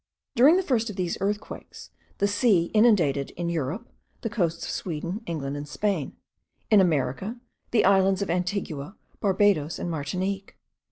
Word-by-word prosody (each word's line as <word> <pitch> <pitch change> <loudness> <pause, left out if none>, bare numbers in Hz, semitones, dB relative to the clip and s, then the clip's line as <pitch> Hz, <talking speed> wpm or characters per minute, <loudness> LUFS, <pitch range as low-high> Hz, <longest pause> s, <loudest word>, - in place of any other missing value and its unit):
During 285 +9 +7
the 380 - +1
first 240 -8 0
of 210 - -6
these 180 -2 -1
earthquakes, 205 +2 -4 0.3
the 200 - +2
sea 205 -5 +2
inundated, 180 - +3
in 170 0 -2
Europe, 170 - -3 0.3
the 225 - -3
coasts 170 -6 -1
of - - -3
Sweden, 175 +4 -4
England, 145 -4 -3
and 145 0 -6
Spain; 195 -3 -2 0.6
in 210 -2 +7
America, 175 - 0 0.3
the 235 - +3
islands 195 0 +4
of 195 - -6
Antigua, 180 -2 -3 0.2
Barbados, 190 -6 +2
and 175 - -3
Martinique. 185 +6 -3
190 Hz, 150 wpm, -26 LUFS, 165-210 Hz, 0.6 s, During